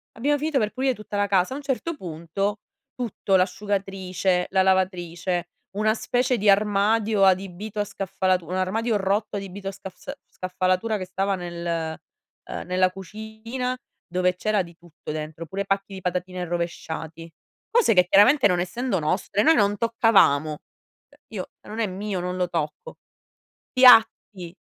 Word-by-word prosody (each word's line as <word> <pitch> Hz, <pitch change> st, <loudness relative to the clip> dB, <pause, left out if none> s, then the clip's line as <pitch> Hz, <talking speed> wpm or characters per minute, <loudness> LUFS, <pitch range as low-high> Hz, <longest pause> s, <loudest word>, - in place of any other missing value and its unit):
Abbiamo 290 Hz, +6 st, +1 dB
finito 305 Hz, -1 st, -1 dB
per 215 Hz, -1 st, 0 dB
pulire 260 Hz, -1 st, 0 dB
tutta 210 Hz, -1 st, -6 dB
la 205 Hz, 0 st, +2 dB
casa. 190 Hz, +4 st, +2 dB
A -, -, -4 dB
un 290 Hz, -, -8 dB
certo 290 Hz, +5 st, -2 dB
punto 185 Hz, -, -3 dB, 0.4 s
tutto, 220 Hz, -5 st, -1 dB
l'asciugatrice, 190 Hz, -1 st, -1 dB
la 190 Hz, -, +3 dB
lavatrice, 180 Hz, -2 st, 0 dB, 0.3 s
una 215 Hz, +1 st, +3 dB
specie 250 Hz, +2 st, 0 dB
di 205 Hz, 0 st, +2 dB
armadio 205 Hz, +1 st, +3 dB
adibito 195 Hz, +2 st, +1 dB
a 205 Hz, -, +1 dB
scaffalatura, 185 Hz, -3 st, -1 dB
un 185 Hz, -, -1 dB
armadio 220 Hz, +4 st, 0 dB
rotto 200 Hz, +2 st, -1 dB
adibito 195 Hz, 0 st, -7 dB
a -, -, -5 dB
scafs 190 Hz, +7 st, -9 dB, 0.2 s
scaffalatura 185 Hz, +4 st, -1 dB
che 185 Hz, -, -5 dB
stava 195 Hz, +2 st, -1 dB
nel, 175 Hz, -1 st, -6 dB, 0.8 s
ehm, -, -, -6 dB
nella 185 Hz, +1 st, +2 dB
cucina 220 Hz, +6 st, -5 dB, 0.3 s
dove 180 Hz, +1 st, 0 dB
c'era 210 Hz, +1 st, 0 dB
di 170 Hz, -1 st, -14 dB
tutto 170 Hz, -3 st, -10 dB
dentro, 155 Hz, +2 st, -6 dB
pure 195 Hz, +5 st, -3 dB
pacchi 195 Hz, 0 st, -2 dB
di 190 Hz, -, -7 dB
patatine 180 Hz, 0 st, -3 dB
rovesciati. 165 Hz, -1 st, -5 dB, 0.4 s
Cose 460 Hz, -, +4 dB
che 180 Hz, -1 st, +4 dB
chiaramente 250 Hz, +8 st, +6 dB
non 180 Hz, -2 st, +1 dB
essendo 195 Hz, +3 st, -1 dB
nostre 190 Hz, +6 st, 0 dB
noi 320 Hz, -, +6 dB
non 205 Hz, -1 st, +2 dB
toccavamo. 195 Hz, -10 st, +3 dB, 0.8 s
Io, -, -, -5 dB
se -, -, -18 dB
non 220 Hz, +2 st, -6 dB
è 220 Hz, -, +1 dB
mio, 195 Hz, +1 st, -4 dB
non 180 Hz, +1 st, -3 dB
lo 180 Hz, -1 st, -1 dB
tocco. 165 Hz, -, -4 dB, 0.8 s
Piatti 225 Hz, -7 st, +5 dB
195 Hz, 155 wpm, -24 LUFS, 180-215 Hz, 0.8 s, chiaramente